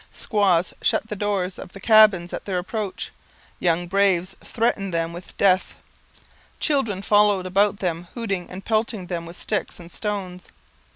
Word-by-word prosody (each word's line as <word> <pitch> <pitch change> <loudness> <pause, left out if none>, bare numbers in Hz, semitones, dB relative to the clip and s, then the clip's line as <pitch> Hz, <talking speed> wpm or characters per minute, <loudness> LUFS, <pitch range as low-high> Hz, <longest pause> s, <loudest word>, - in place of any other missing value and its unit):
Squaws 190 -5 +1
shut 220 - +1
the 210 - -3
doors 195 -2 -2
of - - -10
the 195 - -9
cabins 210 -5 +5
at - - -5
their 190 -3 -2
approach, 195 +2 -4 0.5
young 175 0 +1
braves 190 -1 +2
threatened 215 -4 0
them 165 0 -1
with 175 +2 -11
death, 185 -2 +3 0.8
children 230 - 0
followed 205 -2 +4
them 190 -2 +1
about 175 - -17
hooting 195 -7 -3
and 185 +2 -9
pelting 220 -3 0
them 170 -2 -4
with 170 +1 -10
sticks 210 - -3
and 170 0 -12
stones. 190 -4 -4
195 Hz, 155 wpm, -23 LUFS, 180-210 Hz, 0.8 s, cabins